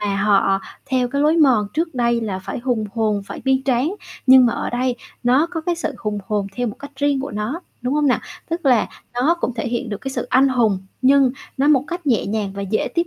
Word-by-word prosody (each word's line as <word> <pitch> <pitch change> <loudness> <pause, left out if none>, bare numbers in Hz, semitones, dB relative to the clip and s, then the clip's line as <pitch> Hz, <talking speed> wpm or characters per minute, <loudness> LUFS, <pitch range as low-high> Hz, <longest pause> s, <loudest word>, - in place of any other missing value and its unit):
mà 205 -1 -1
họ 195 -1 +3 0.3
theo 255 -2 +1
cái 280 +2 0
lối 310 +3 +3
mòn 255 -10 +4
trước 325 -1 -1
đây 235 -1 +1
là 200 -4 -3
phải 190 - -6
hùng 240 -3 -1
hồn, 215 -3 0
phải - - -7
bi 265 0 +2
tráng. 270 +8 +1 0.3
Nhưng 260 -1 +8
mà 235 - +1
ở - - -3
đây 245 0 -1 0.3
nó 260 +7 +3
có 330 -3 -3
cái 345 +1 -1
sự 335 - -3
hùng 210 -1 -3
hồn 205 -2 -1
theo 245 0 -1
một 210 - -5
cách 285 0 -9
riêng 285 -1 +1
của 280 - -5
nó, 215 - -3 0.2
đúng 250 +3 -1
hông 300 -1 +2
nà? 255 - +2 0.3
Tức 335 -3 -2
là 245 -5 +4 0.3
nó 270 +8 +3
cũng 250 - -1
thể 230 - -3
hiện 240 +1 -2
được 205 - -4
cái 270 - -4
sự - - -3
anh 270 +2 +5
hùng, 230 -7 +2 0.2
nhưng 270 -1 +5 0.3
nó 275 +2 +2
một 280 -3 +4
cách 345 -2 -5
nhẹ 235 -6 +2
nhàng 205 -2 -2
và 200 - -4
dễ 200 +2 -1
tiếp 340 0 +1
250 Hz, 250 wpm, -20 LUFS, 215-280 Hz, 0.3 s, Nhưng